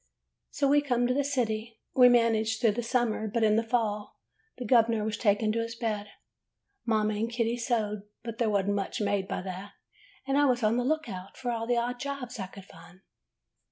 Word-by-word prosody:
"So 280 - 0
we 290 +1 +5
come 245 -4 +1
to 250 - +2
the 285 +2 +1
city. 230 -5 -2
We 250 -1 +7
managed 225 -2 +2
through 230 -3 +4
the 230 +4 -2
summer, 235 -2 0
but 225 +2 0
in 215 -1 +4
the 225 - +3
fall 225 -3 -2 0.4
the 250 - -5
gov 230 0 +5
'ner 225 -2 0
was 215 0 -1
taken 215 0 +2
to 230 - -1
his 230 0 -3
bed. 215 -3 -2 0.8
Mother 215 -2 +2
and 215 +2 -1
Kitty 235 0 0
sewed, 220 -4 -1 0.2
but 230 -1 -6
there 230 -2 +2
was 200 -2 +1
n't 205 - +1
much 200 -1 -2
made 200 -2 0
by - - -3
that, 190 +1 -7 0.5
and 275 +1 +2
I 290 - +5
was 250 -3 +2
on 215 +2 +3
the 245 - +1
lookout 245 -10 -3
for 245 -2 -2
all 230 -1 -3
the 245 0 +2
odd 245 +1 -1
jobs 270 -4 -5
I 190 - -3
could 190 0 -12
find. 170 +1 -16
230 Hz, 215 wpm, -28 LUFS, 210-245 Hz, 0.8 s, We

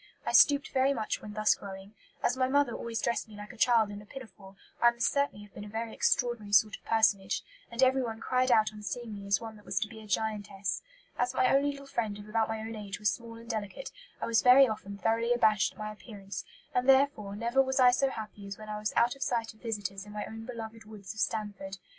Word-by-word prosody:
I - - 0
stooped 285 -1 +6
very 270 +1 +2
much 220 -3 -2
when 210 - -8
thus 215 0 +3
growing. 195 +1 -9 0.3
As 245 - +2
my 260 0 +1
mother 280 -2 +2
always 230 -1 -4
dressed 235 - -1
me 215 - -13
like 210 +3 -9
a - - -14
child 225 -2 +3
in 205 0 -7
a - - -14
pinafore, 205 -7 -11 0.3
I 240 - +8
must 235 0 0
certainly 280 -7 0
have 205 - -21
been 205 - -8
a - - -8
very 225 +1 -4
extraordinary 240 -5 0
sort 205 +1 +5
of - - -17
personage, 205 -4 +2 0.3
and 235 +2 0
everyone 255 -4 +2
cried 255 +2 +1
out 220 -2 +4
on 210 - -10
seeing 220 +3 -5
me 200 -1 -8
as 200 0 +3
one 225 -2 -8
that 210 - -17
was - - 0
to 215 - 0
be 220 -1 -11
a 215 - -12
giantess. 205 -2 -2 0.4
As 245 0 0
my 255 - +4
only 280 +1 +3
little 280 -1 -7
friend 220 -6 -2
of 205 0 -11
about 220 +1 0
my 220 0 -3
own 225 +1 -5
age 200 -3 -6
was 210 +1 +2
small 230 -1 -9
and 230 0 -12
delicate, 220 +1 -4 0.3
I - - -2
was 230 -1 +3
very 260 +2 +8
often 200 -2 -5
thoroughly 230 +3 +1
abashed 215 -4 +3
at - - -25
my 215 0 -4
appearance; 200 -3 -8 0.3
and 250 +2 +1
therefore 265 -7 +3
never 235 +5 +2
was 265 0 0
I 250 -1 +7
so 270 +2 +2
happy 210 -4 -8
as 195 - -6
when 215 0 -10
I 210 0 -4
was 215 0 -2
out 240 +3 +3
of 275 - -17
sight 230 -4 -1
of 215 - -25
visitors 200 -4 -4
in 210 - -10
my 210 - -4
own 225 +1 -8
beloved 225 -2 -7
woods 205 -2 -9
of 220 - -10
Stanford. 200 -4 -2
220 Hz, 250 wpm, -30 LUFS, 205-245 Hz, 0.4 s, I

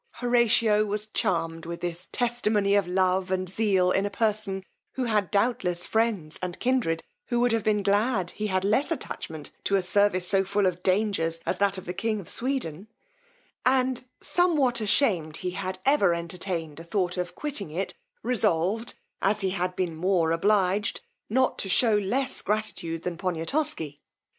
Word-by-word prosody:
Horatio 230 -3 +3
was 210 0 -1
charmed 165 -6 -1
with 170 0 -6
this 175 +1 -4
testimony 220 -4 +1
of 200 -3 +3
love 185 0 +1
and 185 0 -1
zeal 190 -2 +2
in 195 - +2
a 205 - -1
person, 205 -2 -1 0.3
who 260 - -2
had 215 -5 +1
doubtless 200 -5 +1
friends 220 -9 0
and 180 -1 -4
kindred 245 -11 +1 0.2
who 240 - 0
would 245 0 +3
have 225 -2 +1
been 210 -2 +1
glad 200 -2 +1
he 215 - -3
had 185 -2 0
less 240 +10 +2
attachment 160 - -5
to 200 - +1
a 195 - +2
service 185 -1 +2
so 195 0 +3
full 200 +1 0
of 180 -1 0
dangers 185 -4 +1
as 180 - -1
that 200 -1 +2
of 185 - -8
the 180 - -4
king 215 +2 -1
of 190 - -9
Sweden, 225 - -2 0.8
and 255 0 +2
somewhat 295 -10 +2
ashamed 190 - +1
he 180 - -3
had 185 0 -4
ever 205 -11 +4
entertained 170 -2 -4
a - - -8
thought 180 0 -1
of 180 -1 -4
quitting 280 - -3
it, 180 +5 -2 0.3
resolved, 220 -2 +1 0.3
as 210 +2 +1
he 190 -1 0
had 180 -1 -2
been 180 -3 -2
more 170 -1 +1
obliged, 195 +3 +1 0.3
not 260 +4 +1
to 195 - -2
shew 215 +2 +4
less 255 +7 -1
gratitude 175 -6 -2
than 175 -2 -3
Poniatosky. 165 - -1
195 Hz, 165 wpm, -26 LUFS, 180-220 Hz, 0.8 s, ever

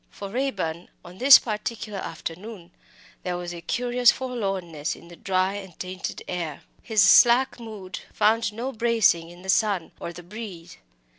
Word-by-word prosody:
For 200 - -8
Raeburn 195 -9 -3 0.2
on 180 +2 -12
this 265 +2 +10
particular 215 -2 -4
afternoon 180 +1 -7 0.5
there 180 -1 -3
was 175 0 -5
a 170 - -8
curious 245 +5 +2
forlornness 195 - -3
in 170 - -15
the 175 - -11
dry 185 +1 0
and 190 -4 -8
tainted 185 +1 -6
air. 170 -5 -4 0.2
His 220 -4 +3
slack 240 +6 +6
mood 210 -5 -8
found 215 0 +2
no 240 +5 -4
bracing 225 -8 +2
in 175 +1 -14
the - - -10
sun 195 -4 +1
or 170 - -5
the 175 +1 -11
breeze. 180 -3 -9
195 Hz, 155 wpm, -25 LUFS, 175-230 Hz, 0.5 s, this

